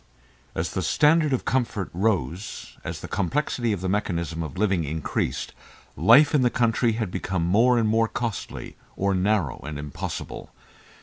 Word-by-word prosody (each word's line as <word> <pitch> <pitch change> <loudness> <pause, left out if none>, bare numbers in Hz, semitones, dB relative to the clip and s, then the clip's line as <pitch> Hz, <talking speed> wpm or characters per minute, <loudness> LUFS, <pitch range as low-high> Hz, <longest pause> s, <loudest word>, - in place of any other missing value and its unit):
And - - 0
as 85 +1 -3
the 95 - -1
standard 150 - +3
of 130 - 0
comfort 115 -7 -1
rose, 95 - -2
as - - -5
the - - -6
complexity 120 - -1
of 100 -4 -2
the 95 - -2
mechanism 85 -4 -1
of 75 -4 -6
living 95 -4 +1
increased, 80 +1 -2 0.4
life 120 - +6
in 145 - +4
the 125 - +4
country 115 -1 +2
had 110 -4 -2
become 95 -2 -2
more 115 +8 +4
and 115 -2 +2
more 115 +1 +3
costly, 115 -2 -5 0.2
or 100 0 +1
narrow 95 - +1
and 75 +2 -6
impossible. 75 -1 -6
100 Hz, 165 wpm, -25 LUFS, 85-115 Hz, 0.4 s, life